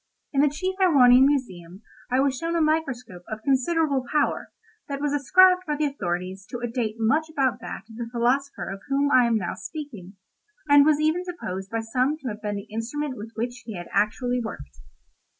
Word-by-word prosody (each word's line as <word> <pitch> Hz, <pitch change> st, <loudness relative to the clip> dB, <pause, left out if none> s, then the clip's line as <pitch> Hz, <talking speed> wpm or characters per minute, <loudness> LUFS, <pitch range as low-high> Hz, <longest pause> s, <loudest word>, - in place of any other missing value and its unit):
In 275 Hz, -, +3 dB
the 295 Hz, -, +4 dB
chief 370 Hz, +6 st, -3 dB
Erewhonian 265 Hz, -7 st, +6 dB
museum 190 Hz, -9 st, -3 dB, 0.3 s
I 255 Hz, +1 st, +2 dB
was 275 Hz, -1 st, +1 dB
shown 330 Hz, +5 st, -3 dB
a -, -, +2 dB
microscope 265 Hz, -, -1 dB
of 220 Hz, 0 st, -6 dB
considerable 275 Hz, +1 st, +1 dB
power, 300 Hz, -1 st, 0 dB, 0.4 s
that 280 Hz, -1 st, -4 dB
was 290 Hz, 0 st, -1 dB
ascribed 365 Hz, +6 st, +5 dB
by 300 Hz, -, 0 dB
the 300 Hz, +1 st, 0 dB
authorities 185 Hz, -7 st, -3 dB
to 245 Hz, -, -5 dB
a 240 Hz, 0 st, -3 dB
date 230 Hz, -2 st, -2 dB
much 300 Hz, +9 st, +1 dB
about 265 Hz, -5 st, 0 dB
that -, -, -7 dB
of 225 Hz, -1 st, -13 dB
the 235 Hz, -1 st, -5 dB
philosopher 255 Hz, +4 st, 0 dB
of 195 Hz, 0 st, -7 dB
whom 280 Hz, +1 st, +1 dB
I 250 Hz, -3 st, +5 dB
am 230 Hz, -1 st, +2 dB
now 180 Hz, -5 st, -3 dB
speaking, 225 Hz, -, -8 dB, 0.5 s
and 285 Hz, 0 st, +6 dB
was 300 Hz, -1 st, +4 dB
even 315 Hz, +4 st, +1 dB
supposed 195 Hz, -, -6 dB
by 225 Hz, +1 st, -2 dB
some 255 Hz, +6 st, 0 dB
to 270 Hz, -5 st, -5 dB
have 210 Hz, 0 st, -7 dB
been 210 Hz, -1 st, -3 dB
the 200 Hz, -, -7 dB
instrument 255 Hz, +5 st, -3 dB
with 220 Hz, +1 st, -9 dB
which 240 Hz, +2 st, -4 dB
he 220 Hz, -, -6 dB
had 175 Hz, -, -8 dB
actually 245 Hz, +5 st, 0 dB
worked. 220 Hz, -, -8 dB
255 Hz, 200 wpm, -25 LUFS, 225-295 Hz, 0.5 s, Erewhonian